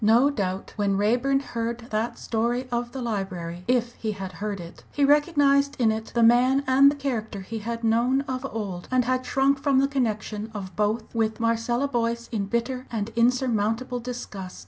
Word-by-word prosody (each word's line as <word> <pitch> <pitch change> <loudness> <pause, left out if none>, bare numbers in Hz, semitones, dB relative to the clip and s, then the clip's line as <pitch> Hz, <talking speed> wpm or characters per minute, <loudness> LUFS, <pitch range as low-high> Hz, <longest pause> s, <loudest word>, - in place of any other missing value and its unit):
No 235 +7 +5
doubt 190 -6 -3
when 200 -2 +1
Raeburn 245 +7 +2
heard 235 -2 -3
that 220 +2 -1
story 240 +3 -1
of 240 0 -2
the 265 -1 -5
library 185 -6 -4
if 240 -1 +1
he 220 -2 -3
had 195 -2 -6
heard 205 -2 -2
it 170 -1 -10
he 285 - +2
recognised 285 -1 +3
in 225 -3 +4
it 220 0 -3
the 235 - +4
man 250 +4 +5
and 270 +2 +6
the 290 - -1
character 230 -8 -3
he 220 +4 -5
had 230 +2 -5
known 235 +4 +3
of 260 -2 -4
old, 195 -5 -5
and 255 -1 +2
had 255 +1 0
shrunk 275 0 +2
from 280 -2 +2
the 275 +1 +4
connection 220 -5 -2
of 190 -3 -6
both 215 +2 -1
with 220 -1 0
Marcella 230 +3 +1
Boyce 235 -2 -1
in 205 -4 -2
bitter 250 +4 -2
and 220 -2 -2
insurmountable 240 0 +1
disgust. 230 -6 -7
235 Hz, 185 wpm, -25 LUFS, 215-255 Hz, -, and